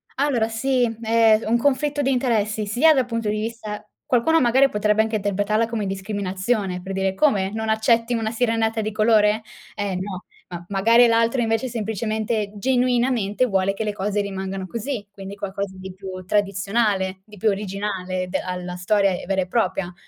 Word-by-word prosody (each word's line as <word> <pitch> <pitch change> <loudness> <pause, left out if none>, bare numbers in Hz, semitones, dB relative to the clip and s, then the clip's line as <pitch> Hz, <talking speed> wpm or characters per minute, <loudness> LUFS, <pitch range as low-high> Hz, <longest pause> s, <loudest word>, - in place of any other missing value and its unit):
Allora 260 -5 +1
sì, 250 +2 +1 0.2
è 225 -1 +4
un 230 +2 +2
conflitto 285 +3 +1
di 270 - +1
interessi, 220 -4 0
sia 275 +10 +4
dal 260 -3 +2
punto 230 -3 -2
di 210 0 -1
vista 215 -2 -5 0.2
qualcuno 320 +7 +3
magari 260 +3 +4
potrebbe 210 0 +2
anche 220 0 0
interpretarla 205 +3 0
come 225 -3 -3
discriminazione, 195 0 -2
per 195 +1 -6
dire: 190 0 0
"Come?! 195 -6 +2
Non 220 0 -3
accetti 230 +2 +2
una 225 -1 -1
sirenetta 225 -1 0
di 215 - -3
colore? 215 0 +3 0.3
Eh 200 -2 -2
no!" 185 0 -5 0.3
Ma 175 -1 -7
magari 230 +5 +5
l'altro 230 +2 +2
invece 225 +2 0
semplicemente, 220 -1 -2
genuinamente, 245 -1 +1
vuole 195 -3 +1
che 220 - -3
le 210 - -1
cose 205 +1 -1
rimangano 195 -1 -4
così, 230 +1 -4
quindi 195 0 -9
qualcosa 200 -1 -5
di 190 0 -8
più 185 -1 -8
tradizionale, 195 0 0
di 210 - -14
più 215 +3 +2
originale, 195 -2 -3
de 190 - -1
alla 180 -1 -5
storia 195 +2 +2 0.2
vera 195 -1 +1
e 180 - -3
propria. 190 -4 -1
215 Hz, 165 wpm, -22 LUFS, 195-230 Hz, 0.3 s, magari